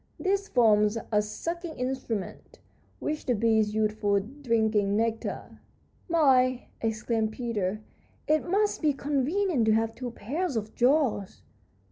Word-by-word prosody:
This 395 +1 0
forms 210 - +3
a 210 -1 +4
sucking 330 - -5
instrument, 250 -5 -4 0.4
which 300 0 -4
the 245 - +2
bees 220 -1 +2
use 215 -1 +2
for 205 -2 +1
drinking 220 -4 0
nectar." 225 0 -3 0.5
"My," 255 -6 +3
exclaimed 220 0 -1
Peter, 215 -4 -2 0.5
"it 310 +2 +1
must 410 +3 +1
be 300 -3 +3
convenient 285 - 0
to 220 - +5
have 225 0 +1
two 250 +1 -5
pairs 280 - -3
of 215 -1 -3
jaws!" 250 -6 +1
235 Hz, 125 wpm, -27 LUFS, 215-290 Hz, 0.5 s, to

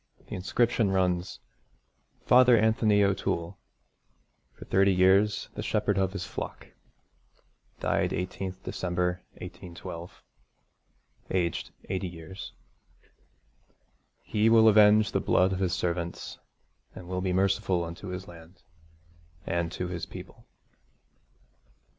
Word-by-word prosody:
The - - -7
inscription 110 +3 +1
runs: 90 -1 0 0.9
FATHER 125 -1 +6
ANTHONY 110 -1 +3
O'TOOLE 90 -3 -1 0.9
FOR - - -13
THIRTY 100 +1 +3
YEARS 95 +3 +3
THE - - -5
SHEPHERD 105 -2 0
OF 95 -1 0
HIS 95 -2 -4
FLOCK - - -7 1.1
Died - - +1
18th 95 +2 -4
December 90 0 -2
1812 85 0 -9 1.1
Aged 85 -3 -1 0.2
80 95 0 -2
years. 85 +2 -9 1.7
'He 110 +1 +2
will 115 -1 +6
avenge 105 0 +6
the - - +1
blood 95 +1 +2
of 95 - -3
his 95 -3 0
servants, 85 -1 -3 0.6
and 90 - -10
will 90 0 -3
be 95 0 -1
merciful 95 -1 +1
unto 85 +4 -7
his 90 +1 -6
land, 85 +2 -14 0.8
and 85 -1 -1
to 90 - -4
his 90 -2 -5
people.' - - -11
95 Hz, 110 wpm, -28 LUFS, 90-105 Hz, 1.7 s, FATHER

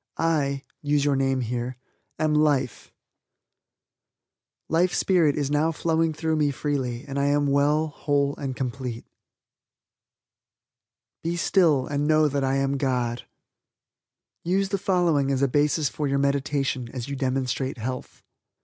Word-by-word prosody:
I 145 -4 0 0.2
(use 145 -1 +1
your 145 - +3
own 135 - +1
name) 125 -2 -1 0.4
am 155 -1 +1
life. 145 -5 +1 1.8
Life 175 +3 +2
Spirit 170 -6 +3
is 145 -1 -1
now 150 +2 +2
flowing 165 0 0
through 160 0 -1
me 150 -1 +2
freely 135 -3 -2
and 140 0 -3
I 140 - +1
am 145 0 +2
well, 145 +3 +2
whole 145 -1 0
and 135 -3 -4
complete. 125 -2 -4 2.2
"Be 170 +1 -1
still 165 -7 +3
and 145 0 -1
know 155 0 +4
that 140 -1 -1
I 135 0 +1
am 135 0 0
God." 125 -3 -1 1.2
USE 190 +3 +1
THE 200 -1 -1
FOLLOWING 175 -8 +2
AS 135 0 +1
A - - +4
BASIS 150 +2 +2
FOR 150 +1 -3
YOUR 140 0 +1
MEDITATION 140 -2 0
AS 125 -1 -5
YOU 140 - -4
DEMONSTRATE 130 0 -1
HEALTH. 125 +3 -6
140 Hz, 140 wpm, -25 LUFS, 135-155 Hz, 2.2 s, know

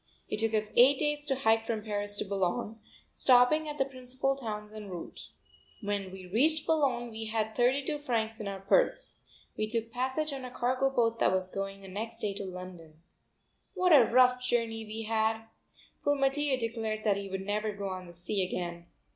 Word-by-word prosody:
It - - -3
took 225 0 +1
us 215 0 -1
eight 260 +3 +7
days 295 0 -1
to 270 - +1
hike 225 -3 +3
from 225 -2 -3
Paris 205 -1 -3
to - - -2
Bologne, 200 +3 -1 0.3
stopping 265 +5 +4
at 295 - -5
the 270 - +2
principal 260 +1 -2
towns 215 -5 -6
en 210 -2 -8
route. 175 -2 -8 0.5
When 200 -2 -3
we 190 -1 -9
reached 295 - +2
Bologne 260 -7 +1
we 220 0 -5
had 220 0 -1
thirty 255 +4 +2
two 295 +1 -2
francs 225 -5 -1
in 210 - -4
our 195 -1 -5
purse. - - +2 0.4
We 215 - -1
took 230 0 -2
passage 260 +5 -1
on 270 -1 -5
a 250 - -5
cargo 255 +2 +1
boat 230 -3 +1
that - - +4
was 185 0 -1
going 195 0 -4
the 195 - -11
next 225 +4 -5
day 210 -3 -1
to 200 0 -5
London. 180 -4 -9 0.8
What 365 -2 +4
a 275 -5 +9
rough 250 0 +5
journey 230 -3 0
we 220 +1 -5
had! 220 0 +1 0.6
Poor 290 - +3
Mattia 275 0 +1
declared 225 -2 -3
that 205 -2 +2
he 200 -1 -5
would 190 0 -4
never 210 +1 -1
go 200 -1 -5
on 185 -1 -6
the 175 - -12
sea 185 +3 -1
again. 175 -2 -4
225 Hz, 195 wpm, -30 LUFS, 200-255 Hz, 0.8 s, a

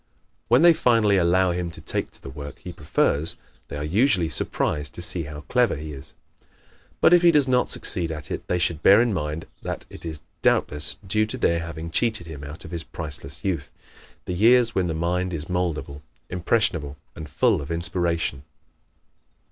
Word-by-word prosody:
When 125 +7 +5
they 170 -1 +8
finally 115 -8 +3
allow 90 +1 +3
him 85 0 -2
to 85 - -9
take - - -3
to - - -20
the 65 - -8
work 70 +1 -8
he - - -9
prefers 75 +3 0 0.3
they - - -6
are 75 - -3
usually 90 - +2
surprised 75 0 -1
to - - -7
see 85 -2 0
how 75 0 -8
clever 125 +6 +2
he 75 0 -7
is. 65 -1 -11 0.9
But - - +6
if 175 - +7
he 175 - +6
does 150 -5 +4
not 125 -1 +2
succeed 85 -2 -3
at 75 -2 -7
it - - -5
they 90 - +1
should 85 -2 0
bear 100 +4 +7
in 120 -2 +2
mind 75 -2 -3 0.2
that - - -5
it - - -11
is 80 -3 -5 0.2
doubtless 75 +1 +1
due 105 +3 +1
to 130 - -3
their 85 -8 +2
having 85 0 -6
cheated 110 -2 0
him 75 -3 -8
out 75 +3 -9
of - - -10
his 85 -2 -4
priceless 75 -1 -8
youth 85 -6 -2 0.5
the 90 - -3
years 115 +4 +4
when 95 -5 +1
the 80 - -2
mind 90 +2 -1
is 75 -1 -5
moldable, 85 -5 -2 0.3
impressionable 90 -5 0 0.2
and 80 -2 -8
full 95 - +2
of 70 - -8
inspiration. 85 -3 -1
85 Hz, 190 wpm, -24 LUFS, 75-105 Hz, 0.9 s, they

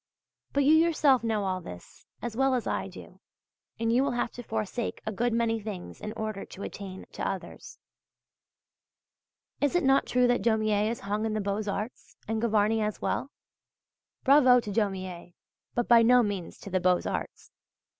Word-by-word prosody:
But 280 - +2
you 295 +3 +5
yourself 310 -6 +4
know 220 -3 0
all 185 -1 -1
this 90 - -12 0.2
as 240 -2 -4
well 270 +1 +2
as 245 - -2
I - - -2
do, - - -12 0.6
and 230 0 +1
you 255 +3 +4
will 280 -2 0
have 240 -1 -1
to 245 - -8
forsake 220 0 -3
a 220 - -2
good 235 +4 0
many 230 -1 +1
things 200 -4 -7
in 210 - -4
order 215 -2 -4
to 200 - -10
attain 190 -2 -7
to - - -3
others. - - -7 1.8
Is 290 +3 +1
it 355 - +3
not 270 0 +3
true 250 0 +3
that 245 0 +2
Daumier 215 -2 +2
is 230 - -4
hung 205 +2 -2
in 220 -1 -1
the - - 0
Beaux 200 +1 -2
Arts 210 +5 -6
and 220 0 -1
Gavarni 220 -1 +2
as 210 -1 -2
well? 270 - -2 0.9
Bravo 260 -3 +6
to 210 - -6
Daumier, 185 -4 -3 0.4
but 240 - 0
by 235 -1 +7
no 245 +2 +6
means 200 -5 -4
to 200 - -9
the 185 - +2
Beaux 180 0 +3
Arts! - - -5
220 Hz, 180 wpm, -28 LUFS, 205-245 Hz, 1.8 s, by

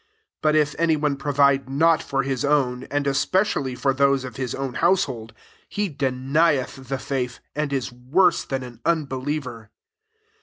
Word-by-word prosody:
8 - - -66
But 155 0 +3
if 150 -1 +2
any 165 -1 +3
one 150 -2 0
provide 140 -1 +2
not 160 +4 +3
for 135 -1 -1
his 135 0 -2
own, 130 -3 +1
and 145 0 -2
especially 140 -1 +1
for 135 +2 +1
those 140 0 +2
of 125 -3 -8
his 130 -3 -3
own 135 -2 -4
household, 130 -10 +1 0.4
he 205 -1 -1
denieth 135 0 0
the 135 +1 -2
faith) 125 -2 -3 0.2
and 150 -1 -1
is 135 -3 -2
worse 130 +10 +2
than 135 -1 -3
an 120 -2 -11
unbe 160 -5 0
liever. 125 -7 -4
135 Hz, 165 wpm, -23 LUFS, 130-150 Hz, 0.4 s, But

